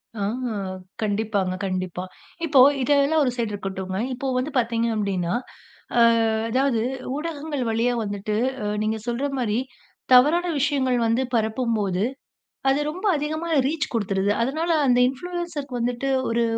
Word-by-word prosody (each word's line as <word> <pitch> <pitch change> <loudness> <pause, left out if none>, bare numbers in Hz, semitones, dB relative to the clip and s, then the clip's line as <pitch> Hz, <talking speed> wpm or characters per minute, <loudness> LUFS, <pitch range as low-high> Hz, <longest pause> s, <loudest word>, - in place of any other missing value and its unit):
ஆ. 210 - -5 0.8
கண்டிப்பாங்க, 205 -3 0
கண்டிப்பா. 185 -1 -3 0.4
இப்போ 285 -4 +4 0.2
இதெல்லாம் 285 +3 +3
ஒரு 250 - +1
சைட் 230 -3 -1
இருக்கட்டுங்க. 190 -1 -4 0.2
இப்போ 255 +2 -4
வந்து 260 +4 -1
பார்த்தீங்க 230 -1 +1
அப்டின்னா, 190 -4 -1 0.6
அ - - +6 0.5
அதாவது 260 0 +2 0.4
ஊடகங்கள் 300 -2 -3
வழியா 230 +2 +1
வந்துட்டு, 205 0 -3 0.3
அ - - -2 0.2
நீங்கச் 220 0 -2
சொல்ற 240 +4 -1
மாதிரி 220 -3 0 0.6
தவறான 305 +8 +6
விஷயங்கள் 270 -3 +1
வந்து 230 +3 +2
பரப்பும்போது, 220 -4 0 0.7
அது 270 +2 +3
ரொம்ப 365 +6 -7
அதிகமா 310 +3 -3 0.2
ரீச் 310 +1 -2
கொடுத்துருது. 200 -3 0
அதனால 310 +7 -1 0.2
அந்த 245 -1 +4
இன்ஃபுலுயன்சர் 340 +1 -4
வந்துட்டு, 245 +3 -1 0.2
ஒரு 235 +1 +1
240 Hz, 125 wpm, -24 LUFS, 210-285 Hz, 0.8 s, அ